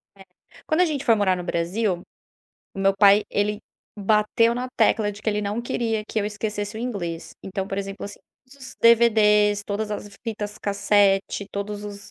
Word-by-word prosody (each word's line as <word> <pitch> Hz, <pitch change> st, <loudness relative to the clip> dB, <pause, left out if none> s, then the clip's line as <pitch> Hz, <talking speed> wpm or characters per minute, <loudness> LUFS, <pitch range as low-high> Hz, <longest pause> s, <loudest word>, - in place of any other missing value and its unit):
É. 195 Hz, -1 st, -16 dB, 0.4 s
Quando 315 Hz, +2 st, +1 dB
a -, -, +6 dB
gente 295 Hz, -5 st, -2 dB
foi 235 Hz, -5 st, +5 dB
morar 200 Hz, -3 st, +2 dB
no 180 Hz, -, -6 dB
Brasil, 175 Hz, +2 st, -1 dB, 0.7 s
o -, -, -9 dB
meu 195 Hz, 0 st, +4 dB
pai, 200 Hz, +1 st, +6 dB
ele 205 Hz, +1 st, 0 dB, 0.4 s
bateu 215 Hz, +3 st, +2 dB
na 250 Hz, +1 st, -3 dB
tecla 210 Hz, -2 st, +3 dB
de 205 Hz, -, -12 dB
que -, -, -1 dB
ele 210 Hz, 0 st, -1 dB
não 205 Hz, +3 st, -2 dB
queria 225 Hz, -2 st, -1 dB
que -, -, -2 dB
eu -, -, -2 dB
esquecesse 210 Hz, 0 st, -4 dB
o -, -, -5 dB
inglês, 180 Hz, -9 st, -4 dB
então, 195 Hz, 0 st, -4 dB
por 195 Hz, 0 st, -4 dB
exemplo, 195 Hz, 0 st, -5 dB
assim, 205 Hz, -, -8 dB, 0.3 s
os 265 Hz, -1 st, -12 dB
DVD's, 210 Hz, -3 st, +5 dB
todas 210 Hz, +1 st, -3 dB
as 210 Hz, 0 st, -5 dB, 0.2 s
fitas 210 Hz, -2 st, -4 dB
cassete, 200 Hz, -1 st, +1 dB
todos 205 Hz, +1 st, -4 dB
os 200 Hz, -1 st, -9 dB
210 Hz, 185 wpm, -23 LUFS, 200-220 Hz, 0.7 s, a